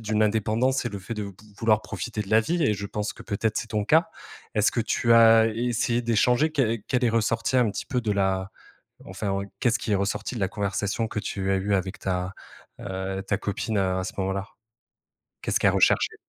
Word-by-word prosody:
d'une 110 -1 0
indépendance, 110 +5 +1
c'est 120 - -2
le 100 - -4
fait 115 +5 -6
de 105 -1 -4
v 100 - -6 0.3
vouloir 110 -2 +3
profiter 115 -3 -4
de 100 - -11
la 110 - +6
vie 170 +8 -1
et 105 -7 +3
je 100 0 -5
pense 105 +1 -3
que, - - -12
peut-être, 110 +1 -1
c'est - - -4
ton 105 -2 -1
cas. 165 - +4 0.5
Est-ce 105 0 +3
que 120 - 0
tu 115 +1 +1
as 115 -1 +7
essayé 120 +1 0
d'échanger, 125 +6 +2
què 115 -7 +1
qu'elle 125 -1 +1
est 115 - +3
ressorti 115 +2 +1
un 120 -3 +4
petit - - -5
peu 125 -3 -1
de 110 -3 -1
la 95 -1 0 0.6
enfin, 100 -2 -3 0.2
qu'est-ce 120 -3 +2
qui 115 - -3
est - - +4
ressorti 100 +6 -2
de 115 - -4
la 95 - +2
conversation 105 +2 -2
que 105 - -3
tu 95 -1 -2
as - - +3
eu 100 +1 0
avec 95 +1 -3
ta, 90 0 -2 0.5
heu, 95 0 -4
ta 100 0 -1
copine 105 +2 -2
à 95 -1 0
ce 95 - -5
moment-là? 95 0 -2 1.0
Qu'est-ce - - 0
qu'elle - - +4
recherchait? - - +3
110 Hz, 215 wpm, -25 LUFS, 100-115 Hz, 1.0 s, as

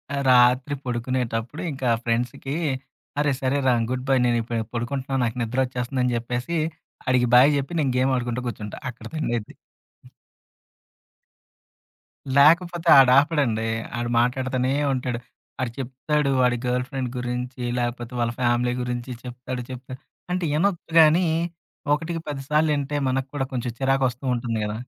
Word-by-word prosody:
ఆహ్, 140 - -1
రాత్రి 125 +3 +4
పడుకునేటప్పుడు 125 +1 -2
ఇంకా 130 -3 -2
ఫ్రెండ్స్‌కి 125 +4 -2 0.6
అరే 145 -1 +2
సరేరా 130 -1 +2 0.2
గుడ్‌బై. 130 +1 +1
నేను 120 -1 +2
ఇప్పుడే 115 0 -2
పడుకుంటున్నాను, 130 +2 -2
నాకు 115 +1 -3
నిద్ర 120 +3 -2
వచ్చేస్తుంది 125 +1 -3
అని 125 -1 +1
చెప్పేసి 125 +8 -3 0.5
ఆడికి 125 -1 +3
బాయ్ 130 +4 +8
చెప్పి 140 +5 -3
నేను 140 -4 +1
గేమ్ 130 +1 +2
ఆడుకుంటూ 120 0 -2
కూర్చుంటా. 105 -3 -6
అక్కడ 120 - -11
తన్నేది 120 -8 -2 2.8
లేకపోతే 170 +3 +4
ఆడాపడండి. 130 -4 +4 0.3
ఆడు 120 0 -2
మాట్లాడుతూనే 130 +1 0 0.2
ఉంటాడు. 125 -2 -2 0.4
ఆడు 125 -2 -1
చెప్తాడు 140 +3 -1
వాడి 125 -1 +3
గర్ల్ 125 0 0
ఫ్రెండ్ 135 -3 -3
గురించి 125 +1 -4 0.2
లేకపోతే 120 0 -3
వాళ్ళ 120 0 +1
ఫ్యామిలీ 120 0 +2
గురించి 125 +1 -4
చెప్తాడు, 125 0 -6
చెప్తాడు. 130 0 -8 0.3
అంటే 180 0 -1
వినొచ్చు 170 +1 0
కానీ 160 +3 +6 0.7
ఒకటికి 165 +3 -2
పది 145 -2 -4
సార్లు 155 +1 +3
ఇంటే 145 +1 -3
మనకు 135 +1 -1
కూడా 140 -2 -1
కొంచెం 125 -2 -2
చిరాకు 135 0 +1
వస్తూ 125 +2 -11
ఉంటుంది 115 -1 -2
గద. 105 0 -2
130 Hz, 135 wpm, -24 LUFS, 120-140 Hz, 2.8 s, బాయ్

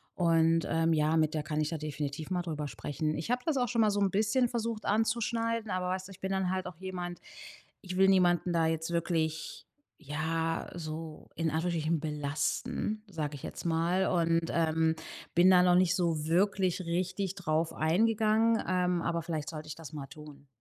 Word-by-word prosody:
Und, 165 -1 +3
ähm, 165 0 +2
ja, 155 +1 +2
mit 155 0 +2
der 150 - -1
kann 155 0 -2
ich 150 - 0
da 165 - -3
definitiv 150 +2 -5
mal 180 - +1
drüber 155 -4 -4
sprechen. 155 +2 -3
Ich 160 +8 -5
habe 250 0 0
das 315 -4 +1
auch 245 -1 +2
schon 235 -1 +1
mal 215 - +4
so 205 - 0
'n 200 - +3
bisschen 220 +6 +2
versucht 230 -2 -3
anzuschneiden. 230 +1 0
Aber 185 -1 -1
weißt 185 0 -3
du, 195 - -12
ich 190 - -13
bin 190 0 -3
dann 190 -1 0
halt 185 0 -1
auch 180 -3 -8
jemand. 180 -1 -5 0.6
Ich 185 -2 -6
will 190 +1 +5
niemanden 180 -2 +3
da 165 -1 +3
jetzt 160 0 -1
wirklich, 160 -2 -2 0.3
ja, 160 +2 -2
so 160 -1 -7
in 165 -1 0
Anführungsstrichen 160 0 0
belasten, 150 +7 -2
sage 155 -6 -4
ich 140 - -11
jetzt - - -7
mal. 170 +3 +1
Und, 165 -2 +1
ähm, 160 -1 +2 0.4
bin 175 +2 +6
da 180 -1 +7
noch 180 -1 +5
nicht 180 -1 +4
so 165 -4 0
wirklich 185 +2 +2
richtig 185 +2 -2
drauf 165 -3 -1
eingegangen. 220 +6 +2
Ähm, 180 -1 +1
aber 170 0 -1
vielleicht 155 -3 -4
sollte 155 -1 -7
ich 150 - -6
das 165 -1 -10
mal 140 -2 -6
tun. 145 0 -13
170 Hz, 190 wpm, -30 LUFS, 160-190 Hz, 0.6 s, da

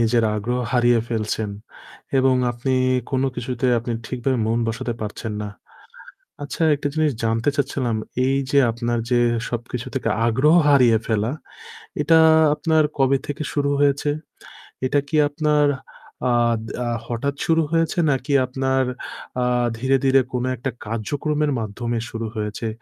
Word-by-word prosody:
নিজের 115 0 +3
আগ্রহ 120 +4 -2
হারিয়ে 120 -1 +4
ফেলছেন। 110 -2 -2 0.7
এবং 130 0 +4 0.2
আপনি 120 +2 -2 0.4
কোন 130 -1 +1
কিছুতে 125 +2 -2
আপনি 120 +1 -4
ঠিকভাবে 125 0 -1
মন 115 +1 +1
বসাতে 115 +1 -3
পারছেন 110 +1 -5
না। 105 - -4 0.9
আচ্ছা, 145 +3 -4
একটা 145 0 -2
জিনিস 155 -2 +2
জানতে 115 +3 0
চাচ্ছিলাম 130 -5 -1 0.3
এই 135 +1 +2
যে 140 - +4
আপনার 120 +1 -2
যে 120 - +4 0.3
সবকিছু 120 +1 -4
থেকে 130 -4 -1 0.2
আগ্রহ 130 +7 +3
হারিয়ে 125 -6 +5
ফেলা, 110 +1 0 0.7
এটা 160 +2 +5 0.4
আপনার 160 0 +2
কবে 135 0 +3
থেকে 145 +2 -4
শুরু 140 -1 +1
হয়েছে? 145 0 +2 0.8
এটা 145 +2 +2
কি 155 - -3
আপনার 150 0 +2 0.6
আ - - +3 0.3
দা 120 +2 -4 0.2
হঠাৎ 130 +4 -2
শুরু 165 -1 +3
হয়েছে 165 +1 +1
নাকি 135 +1 -1
আপনার 130 +1 0 0.6
আ - - +2 0.3
ধীরে, 130 +3 +2
ধীরে, 135 0 +5
কোন 125 -1 -1
একটা 125 +3 -3 0.2
কার্যক্রমের 145 +7 -1
মাধ্যমে 115 +2 -3
শুরু 115 0 -4
হয়েছে? 105 +1 -3
125 Hz, 140 wpm, -22 LUFS, 115-145 Hz, 0.9 s, হারিয়ে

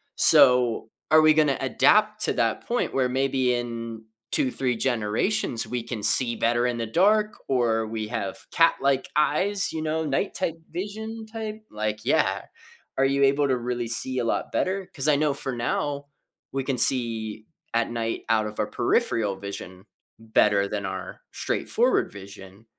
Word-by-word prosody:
So, 125 -3 +5 0.2
are 155 0 +7
we 155 0 +6
gonna 150 -3 +3
adapt 215 +10 +3
to - - 0
that - - -1
point 240 +1 -1
where 130 -1 +2
maybe 130 -1 +1
in 115 -2 -5 0.3
2, 130 - +1
3, 125 -2 -1
generations, 120 - 0
we 125 -1 -3
can 115 -2 -6
see 120 +1 +3
better 120 +1 +1
in 120 -1 -2
the 115 - -2
dark, 210 - +2
or 115 -4 +1
we 110 -1 -4
have 100 -5 -4
cat-like 140 -5 +2
eyes, 185 +7 +1
you 160 - -4
know, 160 +1 -1
night 150 +7 -1
type 165 -3 -1
vision 220 +5 -6
type? 220 -1 -6
Like, 105 0 -3
yeah, - - +2 0.6
are 135 - +3
you 140 +1 +2
able 140 +1 +3
to 130 -1 +1
really 120 -1 -3
see 130 +3 -1
a 120 - -1
lot 115 - -1
better? 190 0 -1
'Cause 135 +2 -1
I 150 - +5
know 150 0 +1
for 135 -1 -5
now, 140 +4 -2 0.4
we 135 0 -2
can 135 -2 -1
see 115 -3 +1 0.3
at 115 0 +1
night 115 -1 -3
out 110 -1 +2
of 105 - -9
our - - -1
peripheral 100 -4 0
vision 95 -1 -8 0.3
better 105 -3 +2
than 100 -1 -4
our 95 0 -6
straightforward - - 0
vision, 100 +1 -12
125 Hz, 165 wpm, -25 LUFS, 115-150 Hz, 0.6 s, are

